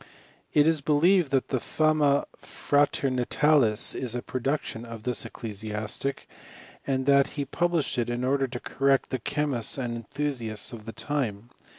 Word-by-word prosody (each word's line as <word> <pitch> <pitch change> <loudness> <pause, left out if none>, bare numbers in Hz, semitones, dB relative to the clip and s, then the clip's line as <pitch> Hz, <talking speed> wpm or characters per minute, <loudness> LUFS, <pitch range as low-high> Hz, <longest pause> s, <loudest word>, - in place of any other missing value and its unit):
It 150 - +4
is 160 -2 +3
believed 155 +3 +3
that 135 -1 0
the 130 - 0
Fama 155 0 +2
Fratemitatis 135 -3 +2
is 125 -2 -2
a 120 - -4
production 130 -2 -3
of 115 -2 -9
this 125 -1 0
ecclesiastic, 110 +3 -3 0.6
and 130 -1 0
that 140 0 +4
he 140 - -1
published 170 -2 -1
it 120 0 -1
in 120 +1 -2
order 135 +1 +1
to 120 -1 -6
correct 135 +1 0
the 130 - -2
che 150 +6 -2
mists 120 -5 +2
and 120 -3 -3
enthusiasts 115 -2 -2
of 110 -3 -9
the 115 - -6
time. 120 -6 -3
130 Hz, 155 wpm, -26 LUFS, 115-145 Hz, 0.6 s, It